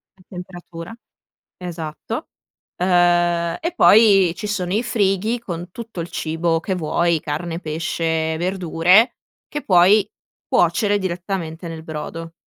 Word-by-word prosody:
la 190 Hz, -, -23 dB
temperatura, 180 Hz, +1 st, -9 dB, 0.6 s
esatto, 175 Hz, -, -6 dB, 0.5 s
uhm, 175 Hz, -1 st, +2 dB
e 340 Hz, 0 st, -3 dB
poi 200 Hz, -, +6 dB
ci -, -, -6 dB
sono 190 Hz, -4 st, -2 dB
i 215 Hz, +5 st, +1 dB
frighi 210 Hz, +1 st, 0 dB
con 175 Hz, -5 st, -7 dB
tutto 225 Hz, -3 st, -8 dB
il 170 Hz, -, -4 dB
cibo 165 Hz, +1 st, -1 dB
che 190 Hz, +3 st, -3 dB
vuoi: 170 Hz, 0 st, +1 dB
carne, 165 Hz, +3 st, -4 dB
pesce, 160 Hz, 0 st, -2 dB
verdure 185 Hz, +5 st, +3 dB, 0.3 s
che 295 Hz, -, -5 dB
puoi 190 Hz, +3 st, +5 dB, 0.4 s
cuocere 205 Hz, -2 st, +2 dB
direttamente 175 Hz, -2 st, -4 dB
nel 160 Hz, -1 st, -7 dB
brodo. 165 Hz, +1 st, -7 dB
175 Hz, 120 wpm, -21 LUFS, 165-195 Hz, 0.6 s, poi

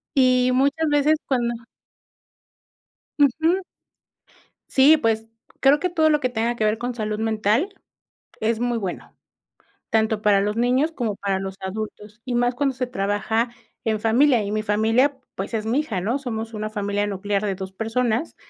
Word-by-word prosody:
Y 255 Hz, -1 st, +4 dB
muchas 285 Hz, +5 st, +2 dB
veces 295 Hz, +2 st, +3 dB
cuando 240 Hz, -3 st, 0 dB, 1.7 s
Uju. 320 Hz, +7 st, +3 dB, 1.1 s
Sí, 280 Hz, +4 st, +6 dB
pues, 225 Hz, -5 st, 0 dB, 0.3 s
creo 280 Hz, +2 st, +5 dB
que 365 Hz, -, 0 dB
todo 320 Hz, -2 st, +3 dB
lo 300 Hz, -1 st, +3 dB
que 255 Hz, -, +1 dB
tenga 235 Hz, 0 st, -1 dB
que 220 Hz, -, 0 dB
ver 215 Hz, +1 st, +1 dB
con 245 Hz, +1 st, -3 dB
salud 215 Hz, -2 st, -3 dB
mental 220 Hz, -, +1 dB, 0.7 s
es 220 Hz, +1 st, 0 dB
muy 240 Hz, 0 st, 0 dB
bueno, 195 Hz, -5 st, -6 dB, 0.7 s
tanto 220 Hz, -1 st, +1 dB
para 205 Hz, -2 st, +4 dB
los 210 Hz, +2 st, -1 dB
niños 255 Hz, +6 st, +2 dB
como 235 Hz, -9 st, -2 dB
para 195 Hz, -1 st, -1 dB
los 195 Hz, 0 st, -5 dB
adultos, 210 Hz, +2 st, -6 dB
y 250 Hz, -2 st, -2 dB
más 245 Hz, +1 st, +1 dB
cuando 270 Hz, 0 st, 0 dB
se 255 Hz, 0 st, -2 dB
trabaja 220 Hz, +2 st, -1 dB, 0.3 s
en 220 Hz, -2 st, 0 dB
familia, 235 Hz, +1 st, +3 dB
y 200 Hz, -, -4 dB
mi 215 Hz, 0 st, -1 dB
familia, 225 Hz, +6 st, +2 dB, 0.2 s
pues, 195 Hz, +4 st, -5 dB
es 220 Hz, -1 st, -2 dB
mi 235 Hz, +5 st, +1 dB
hija, 220 Hz, -12 st, -2 dB
¿no? 235 Hz, +9 st, -1 dB
Somos 230 Hz, -4 st, -5 dB
una 215 Hz, 0 st, -4 dB
familia 205 Hz, -1 st, -1 dB
nuclear 200 Hz, +1 st, -2 dB
de 195 Hz, -2 st, -1 dB
2 190 Hz, 0 st, -7 dB
personas, 225 Hz, -, -1 dB
225 Hz, 165 wpm, -23 LUFS, 210-260 Hz, 1.7 s, Sí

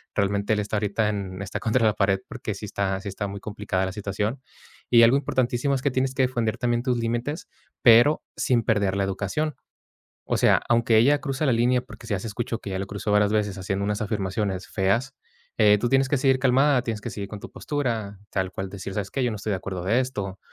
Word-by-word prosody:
realmente 100 Hz, +1 st, +1 dB
él 105 Hz, -, 0 dB
está 105 Hz, +1 st, -2 dB
ahorita 105 Hz, +1 st, 0 dB
en 100 Hz, -2 st, -4 dB
está 100 Hz, -, -4 dB
contra 115 Hz, +1 st, +1 dB
la 110 Hz, -, +4 dB
pared 100 Hz, -2 st, +1 dB
porque, 115 Hz, -4 st, -5 dB
sí 105 Hz, -, -7 dB
está 95 Hz, -1 st, -2 dB
sí 100 Hz, -, -5 dB
está 100 Hz, +1 st, -4 dB
muy 100 Hz, 0 st, -6 dB
complicada 100 Hz, -3 st, -2 dB
la 95 Hz, -, -3 dB
situación, 105 Hz, +5 st, -3 dB, 0.5 s
y 120 Hz, -1 st, +7 dB
algo 120 Hz, +4 st, +6 dB
importantísimo 130 Hz, -1 st, 0 dB
es 130 Hz, -, -2 dB
que 140 Hz, -, +1 dB
tienes 130 Hz, +1 st, 0 dB
que 135 Hz, -, +1 dB
defender 120 Hz, -4 st, 0 dB
también 120 Hz, 0 st, 0 dB
tus 125 Hz, -2 st, +1 dB
límites, 120 Hz, +8 st, -2 dB, 0.3 s
pero 120 Hz, +6 st, +6 dB, 0.2 s
sin 120 Hz, -3 st, +2 dB
perder 100 Hz, -3 st, +1 dB
la 100 Hz, -, +1 dB
educación. 100 Hz, +11 st, -2 dB, 0.8 s
O -, -, +3 dB
sea, -, -, +4 dB
aunque 115 Hz, -1 st, +4 dB
ella 145 Hz, +6 st, +5 dB
cruza 140 Hz, +1 st, -2 dB
la 130 Hz, -, +4 dB
línea, 120 Hz, +2 st, +2 dB
porque 125 Hz, -2 st, -13 dB
si 110 Hz, -, -1 dB
ya 100 Hz, -, 0 dB
se 115 Hz, -, -6 dB
escuchó 115 Hz, +1 st, -3 dB
que -, -, -7 dB
ella 95 Hz, -, -2 dB
lo 100 Hz, -, -2 dB
cruzó 100 Hz, +1 st, -3 dB
varias 105 Hz, 0 st, +3 dB
veces 105 Hz, -2 st, 0 dB
haciendo 95 Hz, +1 st, -2 dB
unas 105 Hz, 0 st, -1 dB
afirmaciones 100 Hz, -2 st, -2 dB
feas, 115 Hz, +8 st, 0 dB, 0.4 s
eh, 105 Hz, -2 st, +6 dB
tú 120 Hz, -, 0 dB
tienes 135 Hz, +1 st, +3 dB
que 145 Hz, -, +2 dB
seguir 130 Hz, 0 st, +3 dB
calmada. 135 Hz, +1 st, +4 dB
Tienes 110 Hz, -3 st, -3 dB
que -, -, -5 dB
seguir 100 Hz, -1 st, -5 dB
con 105 Hz, -, -7 dB
tu -, -, -10 dB
postura, 115 Hz, -9 st, -3 dB
tal 95 Hz, -1 st, -1 dB
cual 95 Hz, +1 st, -5 dB
decir: 95 Hz, 0 st, -7 dB
"¿Sabes 100 Hz, -2 st, -3 dB
qué?, 135 Hz, -, -1 dB
yo 120 Hz, -, +1 dB
no 105 Hz, -, -4 dB
estoy 105 Hz, -, -5 dB
de -, -, +1 dB
acuerdo 95 Hz, -1 st, -5 dB
de 110 Hz, +7 st, +2 dB
esto", 100 Hz, -7 st, -5 dB
110 Hz, 235 wpm, -25 LUFS, 100-125 Hz, 0.8 s, y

